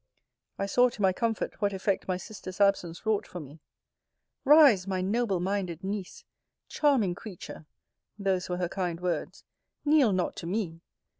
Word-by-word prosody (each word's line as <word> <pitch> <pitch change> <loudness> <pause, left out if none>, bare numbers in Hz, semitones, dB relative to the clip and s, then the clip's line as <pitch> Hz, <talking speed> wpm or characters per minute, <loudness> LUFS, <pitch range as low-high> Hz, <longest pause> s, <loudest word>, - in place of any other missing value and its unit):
I 195 - -1
saw, 245 +5 +4
to 225 - -9
my 190 -1 +4
comfort, 225 +2 -2
what 200 -1 +1
effect 195 0 -1
my 185 -1 0
sister's 185 -1 -9
absence 195 -3 +1
wrought 220 -2 +1
for 180 - -7
me. 150 0 -11 0.9
Rise, 270 -10 +7
my 190 -1 -1
noble 200 0 0
minded 185 -2 -2
Niece! 195 -1 -5 0.4
Charming 265 - +2
creature! 175 -5 -10 0.5
[those 190 -3 -1
were 180 - -1
her 180 -1 -1
kind 175 -2 -3
words] 180 -1 -3 0.4
kneel 290 -6 +5
not 185 -2 -1
to 170 - -6
me! 175 -4 -3
195 Hz, 155 wpm, -28 LUFS, 180-215 Hz, 0.9 s, Rise